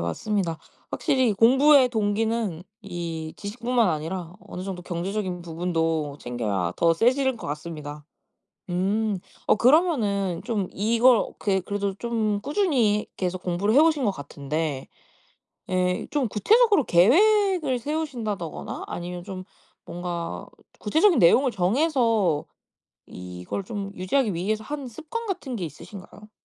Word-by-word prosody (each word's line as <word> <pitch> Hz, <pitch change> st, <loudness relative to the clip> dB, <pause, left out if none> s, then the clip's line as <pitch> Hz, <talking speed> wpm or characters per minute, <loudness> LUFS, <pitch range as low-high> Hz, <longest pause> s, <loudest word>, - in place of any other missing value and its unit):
맞습니다. 165 Hz, -, -2 dB, 0.3 s
확실히 260 Hz, -7 st, +2 dB
공부의 265 Hz, +5 st, +6 dB
동기는 220 Hz, -4 st, -1 dB, 0.2 s
이 170 Hz, -4 st, -5 dB
지식뿐만 235 Hz, +2 st, 0 dB
아니라 165 Hz, +2 st, -3 dB
어느 180 Hz, -, -8 dB
정도 185 Hz, -2 st, -6 dB
경제적인 180 Hz, +1 st, -3 dB
부분도 165 Hz, -3 st, -2 dB
챙겨야 105 Hz, -8 st, -2 dB
더 165 Hz, 0 st, +3 dB
세지는 255 Hz, +6 st, +2 dB
것 -, -, -8 dB
같습니다. 150 Hz, -1 st, -6 dB, 0.7 s
음. 200 Hz, +3 st, 0 dB, 0.3 s
어 -, -, +5 dB
그러면은 220 Hz, -, +2 dB
좀 205 Hz, -6 st, -1 dB
이걸 230 Hz, +4 st, +4 dB
어떻게 195 Hz, -2 st, -1 dB
그래도 200 Hz, +1 st, -3 dB
좀 220 Hz, -3 st, -1 dB
꾸준히 260 Hz, -, +1 dB
계속 185 Hz, -1 st, -2 dB
공부를 185 Hz, +5 st, 0 dB
해오신 305 Hz, -3 st, +4 dB
것 205 Hz, -, +2 dB
같은데 145 Hz, -1 st, -4 dB, 0.8 s
예 180 Hz, 0 st, 0 dB
좀 280 Hz, -5 st, +1 dB
구체적으로 410 Hz, -, +4 dB
계획을 345 Hz, -, +4 dB
세우신다더거나 235 Hz, -, -4 dB
아니면 175 Hz, 0 st, -6 dB
좀 185 Hz, 0 st, -7 dB, 0.4 s
뭔가 170 Hz, -, -5 dB, 0.3 s
구체적인 330 Hz, -, +3 dB
내용을 245 Hz, +9 st, +5 dB
정해서 220 Hz, -, +1 dB, 0.6 s
이걸 90 Hz, -, -6 dB
좀 200 Hz, -3 st, -5 dB
유지하기 205 Hz, +4 st, 0 dB
위해서 215 Hz, +6 st, -2 dB
하는 285 Hz, +1 st, -5 dB
습관 320 Hz, -, -6 dB
같은 355 Hz, -, -4 dB
게 180 Hz, -, -3 dB
있으신가요? 200 Hz, +7 st, -11 dB
200 Hz, 295 characters per minute, -25 LUFS, 175-250 Hz, 0.8 s, 공부의